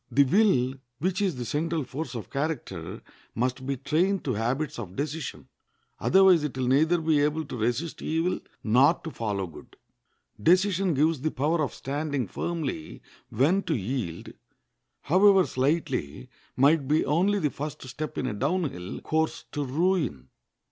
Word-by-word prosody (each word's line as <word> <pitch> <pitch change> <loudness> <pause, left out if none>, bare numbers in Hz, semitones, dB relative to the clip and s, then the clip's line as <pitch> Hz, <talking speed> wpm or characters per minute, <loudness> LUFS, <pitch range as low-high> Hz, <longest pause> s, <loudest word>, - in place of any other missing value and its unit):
The 140 - +5
will, 135 - +3 0.2
which 185 +7 -1
is 190 -6 +1
the 125 -1 -5
central 155 +5 -1
force 130 +1 -6
of 110 -5 -7
character, 135 - -4 0.3
must 125 +2 -1
be 140 -1 -1
trained 165 +9 +1
to 130 - -1
habits 120 +7 -2
of 95 -5 -7
decision; 150 0 -4 0.5
otherwise 190 -4 +5
it 145 -3 -3
will 130 - 0
neither 155 +7 +3
be 160 -2 +2
able 150 +2 0
to 135 - -7
resist 120 +9 -2
evil 165 +3 0 0.2
nor 130 +9 +5
to 160 - -8
follow 105 -6 -2
good. 80 -4 -13 0.7
Decision 185 - +3
gives 155 0 +2
the 155 - 0
power 155 +4 0
of 145 - -2
standing 145 -3 -2
firmly 155 - -4 0.3
when 150 - +2
to 165 - -1
yield, 105 -6 -4 0.7
however 190 +3 +5
slightly, 135 - -1 0.3
might 140 +1 +4
be 150 +2 +2
only 185 +8 +2
the 150 -7 0
first 150 +1 -6
step 150 +4 -6
in - - -1
a 130 - -2
down 150 - 0
hill 90 +1 -7
course 160 0 -1
to 145 - -2
ruin. 150 - 0
145 Hz, 155 wpm, -27 LUFS, 125-165 Hz, 0.7 s, The